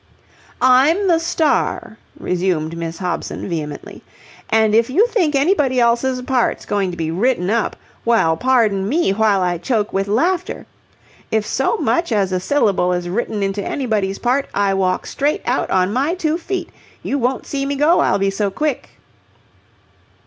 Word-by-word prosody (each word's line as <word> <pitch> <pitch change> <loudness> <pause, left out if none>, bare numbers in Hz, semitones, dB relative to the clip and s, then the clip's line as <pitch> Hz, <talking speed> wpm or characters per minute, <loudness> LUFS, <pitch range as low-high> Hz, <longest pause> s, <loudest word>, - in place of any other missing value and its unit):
"I'm 280 +10 +4
the 335 -2 +3
star," 330 -2 -1 0.2
resumed 175 -3 -1
Miss 165 0 -5
Hobson, 180 -3 -4
vehemently, 155 -5 -6 0.5
"and, 220 -1 +3
if 230 +2 +3
you 370 - +4
think 345 -12 +1
anybody 275 -4 +2
else's 245 +2 +1
part's 250 -1 0
going 200 -2 -1
to 175 - -7
be 160 -1 -2
written 195 0 0
up... 230 -1 0 0.3
well, 225 -9 +2
pardon 215 -4 +1
me 315 - +1
while 205 -2 +2
I 175 -1 -1
choke 215 +1 -1
with 195 +1 0
laughter! 340 - -1 0.6
If 220 -1 0
so 465 - 0
much 340 - 0
as 200 -4 +1
a 185 - 0
syllable 195 -6 +1
is 175 0 -3
written 210 +1 -2
into 195 +1 -2
anybody's 210 -8 -1
part, 255 +3 0
I 200 -1 +2
walk 185 -1 0
straight 290 +2 -1
out 250 +2 0
on 185 +1 +1
my 280 +8 0
two 325 -2 -1
feet. 365 +2 -4 0.3
You 280 - -1
won't 255 +1 -1
see 275 -1 -3
me 280 - -1
go, 300 +5 +3
I'll - - +2
be 195 0 0
so 200 +1 -1
quick." 295 +6 -3
225 Hz, 165 wpm, -19 LUFS, 195-280 Hz, 0.6 s, I'm